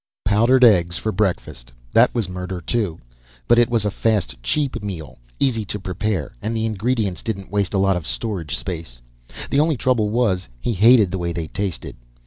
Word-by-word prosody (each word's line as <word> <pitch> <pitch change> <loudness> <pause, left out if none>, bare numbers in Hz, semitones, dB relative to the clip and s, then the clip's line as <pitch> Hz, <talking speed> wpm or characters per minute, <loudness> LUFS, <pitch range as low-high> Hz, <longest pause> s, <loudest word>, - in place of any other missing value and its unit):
Powdered 115 +6 +4
eggs 85 -7 +5
for 110 - -2
breakfast. 80 - -2 0.2
That 120 +2 +5
was 115 -6 0
murder, 90 0 -5
too. 100 -4 -2 0.5
But 120 - +5
it 120 0 +4
was 115 -3 +1
a 105 - +1
fast, 105 - 0
cheap 135 - -1
meal, 90 -10 -7 0.2
easy 115 -5 +1
to 105 +1 -4
prepare, 95 -3 -3
and 115 +2 -2
the 110 - 0
ingredients 110 -3 -1
didn't 100 -4 -5
waste 100 -1 0
a - - +3
lot 95 0 +3
of 85 -3 -4
storage 85 -11 -3
space. 80 -10 -4 0.5
The 140 - +3
only 155 -1 +2
trouble 115 -4 +1
was, 105 - 0
he 120 - -1
hated 110 -1 +5
the 95 - -2
way 85 -1 -2
they 85 -1 -3
tasted. 95 +3 -4
100 Hz, 185 wpm, -21 LUFS, 90-115 Hz, 0.5 s, eggs